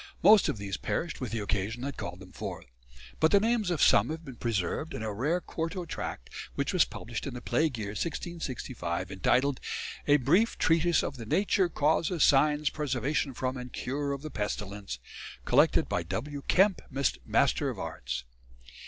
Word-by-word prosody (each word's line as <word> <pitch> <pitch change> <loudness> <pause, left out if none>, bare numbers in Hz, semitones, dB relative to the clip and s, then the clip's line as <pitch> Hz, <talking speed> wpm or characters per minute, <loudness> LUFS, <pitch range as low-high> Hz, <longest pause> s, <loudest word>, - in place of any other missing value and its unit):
Most 205 +2 +7
of - - -1
these 100 -1 -4
perished 165 -4 -3
with 125 -5 -3
the 115 -1 -2
occasion 105 +5 -2
that 140 0 -3
called 90 +2 -6
them 90 -1 -12
forth; - - -6 0.5
but 160 - +5
the 200 - +6
names 225 -2 +1
of 175 -4 +2
some - - +5
have 160 +1 -5
been 135 -3 -8
preserved 115 - -2
in - - -4
a 110 -1 -2
rare 145 - +1
quarto 170 +1 -4
tract 60 - -6 0.2
which - - -1
was - - +5
published - - -6
in - - -5
the - - -4
Plague 150 +2 0
year, 105 -2 -3
1665, 125 - -4
entitled 125 +8 +2 0.5
"A 145 0 +6
Brief 170 - +3
Treatise 165 +1 +3
of 135 - -4
the 115 - -7
Nature, 190 - +2
Causes, 160 +2 +2
Signes, 150 +1 +4
Preservation 140 -1 -1
from 130 +1 -2
and 125 0 -7
Cure 140 +2 -2
of 140 +1 -4
the 155 - -6
Pestilence," 105 -4 -4 0.5
"collected - - +4
by - - 0
W. 115 - -4
Kemp, 190 0 +4
Mr. 135 -1 +1
of - - -5
Arts." - - -4
140 Hz, 175 wpm, -29 LUFS, 110-160 Hz, 0.5 s, Most